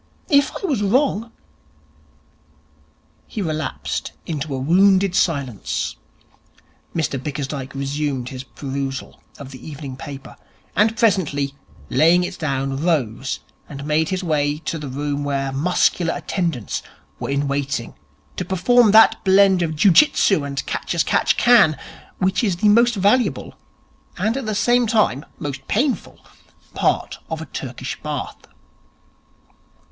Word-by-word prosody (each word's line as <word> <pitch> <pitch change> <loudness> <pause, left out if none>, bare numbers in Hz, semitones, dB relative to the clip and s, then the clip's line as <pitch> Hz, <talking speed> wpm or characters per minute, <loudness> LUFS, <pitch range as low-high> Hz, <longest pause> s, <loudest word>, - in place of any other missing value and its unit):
If 285 -3 +4
I - - -4
was 275 - 0
wrong 230 +1 +1 1.2
' 75 0 -35 0.5
He - - -6
relapsed 155 -7 -3
into 150 -3 -3
a - - -3
wounded 190 +6 +4
silence. 140 - -1 1.0
Mr 145 -5 -1
Bickersdyke 140 -1 -5
resumed 140 -2 -2
his 130 -1 -7
perusal 135 +2 -5 0.2
of 140 -2 -10
the 130 - -11
evening 145 -3 -7
paper, 135 0 -9 0.4
and 220 +2 +3
presently, 155 - +1 0.4
laying 165 +7 +4
it 180 +1 -5
down, 135 -3 -1
rose 135 -7 -1 0.3
and 140 -1 -7
made 155 +1 +1
his 185 0 -2
way 150 -3 0
to 165 - -2
the 150 - -6
room 145 +2 -3
where 135 -1 -1
muscular 170 +3 +1
attendants 165 - -2 0.4
were - - -4
in 140 +1 0
waiting 140 -4 -2 0.4
to - - -1
perform 215 +6 +3
that 225 +1 +6
blend 190 -1 +5
of 160 -2 -1
Jiu 185 +6 +5
Jitsu 195 - +4
and 140 -1 -4
Catch - - -3
as 165 - +3
catch - - +1
can 215 - +5 0.4
which 190 +3 +1
is 195 -6 +1
the 205 +4 +2
most 235 +2 +4
valuable 205 +6 +1 0.6
and 220 +3 0
at 270 -4 -4
the 215 - -1
same 240 +3 +3
time 210 - +2
most 140 -2 -6
painful 260 +5 -1 0.5
part - - 0
of - - -3
a - - -6
Turkish - - -6
Bath. - - -5
155 Hz, 135 wpm, -21 LUFS, 140-200 Hz, 1.2 s, that